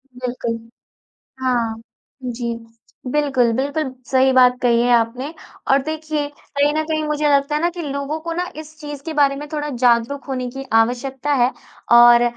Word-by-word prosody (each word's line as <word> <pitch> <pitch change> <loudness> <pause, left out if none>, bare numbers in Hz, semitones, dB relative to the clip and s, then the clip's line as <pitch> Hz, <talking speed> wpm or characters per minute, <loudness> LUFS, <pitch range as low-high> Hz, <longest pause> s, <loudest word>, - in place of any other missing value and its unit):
बिल्कुल। 245 -2 -3 0.9
हाँ 235 -3 0 0.5
जी, 240 -1 -3 0.6
बिल्कुल, 270 -5 +2
बिल्कुल 275 +1 -2 0.2
सही 265 0 +4
बात 250 -1 +5
कही 235 -1 +3
है 245 0 +2
आपने। 245 +7 -1 0.4
और 270 0 +4
देखिए 310 -1 -3
कहीं 290 0 -1
न 310 0 0
कहीं 310 -1 -1
मुझे 300 0 0
लगता 280 +2 0
है 305 - 0
ना 345 - +2
कि 350 0 -7
लोगों 280 +1 -3
को 335 0 -4
ना 355 +1 -1
इस 310 0 -10
चीज़ 290 -2 -7
के 320 - -5
बारे 280 -2 +3
में 295 +1 -7
थोड़ा 295 0 -2
जागरूक 245 +2 +1
होने 255 -2 -3
की 270 +1 -6
आवश्यकता 250 +5 +1
है। 250 - +2 0.5
और 240 0 +8
275 Hz, 170 wpm, -20 LUFS, 245-295 Hz, 0.9 s, और